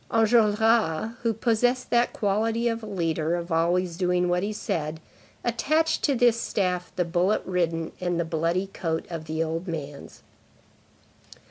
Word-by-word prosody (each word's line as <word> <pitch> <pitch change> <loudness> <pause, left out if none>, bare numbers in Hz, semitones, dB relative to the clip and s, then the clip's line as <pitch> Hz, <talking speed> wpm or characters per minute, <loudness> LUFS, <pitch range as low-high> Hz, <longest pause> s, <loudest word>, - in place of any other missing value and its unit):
Enjolras, 220 -3 +3
who 230 -1 +1
possessed 240 +3 0
that 240 0 +3
quality 225 +3 0
of 230 0 -1
a 220 - -8
leader, 165 -4 -1
of 170 0 -5
always 170 +1 +1
doing 180 -1 +1
what 180 0 +1
he 205 +2 -2
said, 160 -6 -3 0.4
attached 310 +7 +1
to 280 - +2
this 235 -1 +3
staff 180 -3 -1
the 180 - 0
bullet 180 +4 +1
ridden 165 -3 -1
and 175 -2 -1
bloody 165 +3 0
coat 160 -2 -2
of 165 -2 -5
the 160 +1 -1
old 165 +3 -4
man's. 145 -4 -7
180 Hz, 145 wpm, -26 LUFS, 165-225 Hz, 0.4 s, Enjolras